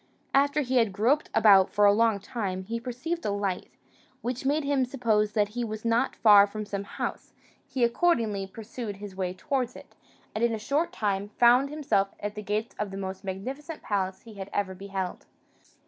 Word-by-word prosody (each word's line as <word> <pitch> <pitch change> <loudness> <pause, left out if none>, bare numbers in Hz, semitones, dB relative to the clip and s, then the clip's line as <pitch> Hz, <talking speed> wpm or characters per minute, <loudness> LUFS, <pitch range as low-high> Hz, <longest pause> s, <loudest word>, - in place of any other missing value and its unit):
After 285 +2 +3
he 260 -1 0
had 225 -4 +3
groped 240 +9 +2
about 195 -3 +6
for 205 - +3
a 200 - +7
long 225 -1 +3
time, 195 -4 -4
he 230 +4 -4
perceived 255 +8 -4
a - - -1
light, 200 -2 -2 0.5
which 250 +2 -2
made 295 +2 +2
him 280 -2 +2
suppose 225 -5 +1
that 210 -2 +2
he 240 +3 -3
was 215 0 -5
not 230 0 +1
far 205 -2 +7
from 215 +1 -5
some 200 -1 -4
house: - - -5 0.3
he 255 - -1
accordingly 235 - +1
pursued 220 +1 -7
his 200 -1 -9
way 185 -1 -2
towards 255 +2 -2
it, - - -13 0.4
and 215 - -2
in 235 -1 +2
a - - -3
short 280 +10 0
time 200 -1 -1
found 245 +3 +5
himself 275 -10 0
at 205 0 -4
the 210 - -6
gates 210 +2 -2
of 210 -1 -1
the 195 - -7
most 190 -1 -5
magnificent 265 - -6
palace 190 -2 -2
he 225 - -12
had 195 -1 -7
ever 195 -2 -1
beheld. 190 -1 -5
215 Hz, 195 wpm, -27 LUFS, 200-250 Hz, 0.5 s, a